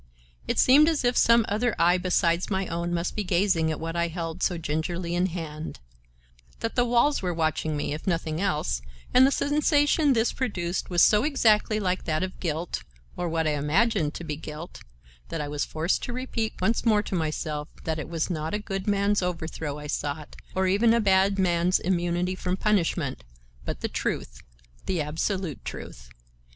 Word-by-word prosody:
It -, -, -1 dB
seemed 295 Hz, +5 st, +6 dB
as 315 Hz, -5 st, 0 dB
if 245 Hz, 0 st, +2 dB
some 230 Hz, -1 st, +5 dB
other 220 Hz, +3 st, 0 dB
eye 175 Hz, +2 st, +4 dB
besides 180 Hz, -1 st, +1 dB
my 190 Hz, -1 st, 0 dB
own 170 Hz, 0 st, -3 dB
must 170 Hz, 0 st, -2 dB
be 210 Hz, -, -1 dB
gazing 180 Hz, -3 st, +2 dB
at 155 Hz, -, -3 dB
what 165 Hz, +1 st, -4 dB
I 170 Hz, 0 st, +1 dB
held 165 Hz, -1 st, -5 dB
so 180 Hz, -, +1 dB
gingerly 170 Hz, +3 st, -2 dB
in 180 Hz, +1 st, +2 dB
hand; 160 Hz, -3 st, -6 dB, 0.8 s
that 225 Hz, -, -2 dB
the 245 Hz, -, +2 dB
walls 245 Hz, +5 st, +3 dB
were 180 Hz, -2 st, -2 dB
watching 155 Hz, -1 st, 0 dB
me, 145 Hz, -, -2 dB
if 155 Hz, -, -7 dB
nothing 165 Hz, -2 st, -1 dB
else, 150 Hz, -, 0 dB, 0.3 s
and 260 Hz, +1 st, +7 dB
the -, -, +1 dB
sensation 290 Hz, 0 st, +3 dB
this 225 Hz, -1 st, +1 dB
produced 185 Hz, -8 st, -2 dB
was 175 Hz, -2 st, +4 dB
so 210 Hz, +1 st, +5 dB
exactly 220 Hz, -7 st, +3 dB
like 185 Hz, -2 st, -1 dB
that 155 Hz, +1 st, 0 dB
of 185 Hz, 0 st, -5 dB
guilt 165 Hz, 0 st, -2 dB, 0.3 s
(or 175 Hz, -1 st, -2 dB
what 160 Hz, 0 st, 0 dB
I 155 Hz, -, +2 dB
imagined 150 Hz, +3 st, +1 dB
to -, -, -6 dB
be 155 Hz, -3 st, -3 dB
guilt), 155 Hz, +2 st, -8 dB, 0.5 s
that -, -, -3 dB
I 150 Hz, -, -3 dB
was 145 Hz, -1 st, -2 dB
forced 160 Hz, +3 st, -1 dB
to 240 Hz, -, -4 dB
repeat 245 Hz, -3 st, -3 dB
once 210 Hz, +5 st, +1 dB
more 215 Hz, -3 st, +3 dB
to -, -, -7 dB
myself 155 Hz, -3 st, -2 dB, 0.2 s
that 160 Hz, -1 st, -2 dB
it -, -, -6 dB
was 165 Hz, -2 st, -1 dB
not 160 Hz, +1 st, -2 dB
a -, -, +1 dB
good 195 Hz, -2 st, -5 dB
man's 205 Hz, 0 st, +2 dB
overthrow 160 Hz, -4 st, -3 dB
I 150 Hz, -, -8 dB
sought, 145 Hz, 0 st, -4 dB, 0.2 s
or 190 Hz, 0 st, +2 dB
even 215 Hz, +5 st, +4 dB
a -, -, +3 dB
bad 195 Hz, -1 st, +3 dB
man's 180 Hz, -1 st, +2 dB
immunity 175 Hz, 0 st, 0 dB
from 185 Hz, 0 st, -2 dB
punishment, 170 Hz, -, 0 dB, 0.4 s
but -, -, -4 dB
the -, -, 0 dB
truth, -, -, -3 dB, 0.5 s
the 185 Hz, -, 0 dB
absolute 160 Hz, +2 st, -2 dB
truth. -, -, -8 dB
180 Hz, 190 wpm, -26 LUFS, 160-210 Hz, 0.8 s, and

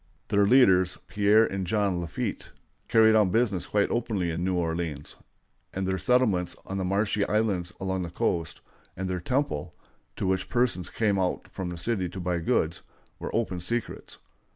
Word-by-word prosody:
Their 100 Hz, 0 st, +3 dB
leaders, 95 Hz, -8 st, +5 dB
Pierre 105 Hz, +2 st, +4 dB
and 95 Hz, -3 st, -3 dB
John 100 Hz, -4 st, +1 dB
Lafitte, 85 Hz, -, -4 dB, 0.4 s
carried 110 Hz, -1 st, +5 dB
on 105 Hz, -3 st, +4 dB
business 105 Hz, -4 st, +1 dB
quite 105 Hz, -1 st, +1 dB
openly 105 Hz, -7 st, -1 dB
in 85 Hz, +2 st, -3 dB
New 95 Hz, 0 st, 0 dB
Orleans; 80 Hz, -4 st, -3 dB, 0.6 s
and 95 Hz, 0 st, -1 dB
their 95 Hz, 0 st, -1 dB
settlements 110 Hz, -9 st, +2 dB
on 95 Hz, 0 st, -4 dB
the -, -, -1 dB
marshy 100 Hz, +2 st, +1 dB
islands 100 Hz, -5 st, 0 dB
along 95 Hz, -1 st, -2 dB
the 85 Hz, -, -4 dB
coast, 85 Hz, -2 st, -2 dB, 0.4 s
and 95 Hz, +1 st, -3 dB
their 90 Hz, -1 st, -2 dB
"temple," 125 Hz, -, -2 dB, 0.4 s
to -, -, -3 dB
which 95 Hz, 0 st, 0 dB
persons 120 Hz, -8 st, 0 dB
came 105 Hz, -3 st, +1 dB
out 90 Hz, -1 st, -1 dB
from 95 Hz, -2 st, -4 dB
the 90 Hz, -, -6 dB
city 95 Hz, 0 st, -1 dB
to 95 Hz, -, -7 dB
buy 90 Hz, -1 st, -1 dB
goods, 80 Hz, 0 st, 0 dB, 0.4 s
were -, -, -5 dB
open 105 Hz, -6 st, -1 dB
secrets. 115 Hz, +7 st, -4 dB
95 Hz, 170 wpm, -27 LUFS, 90-110 Hz, 0.6 s, leaders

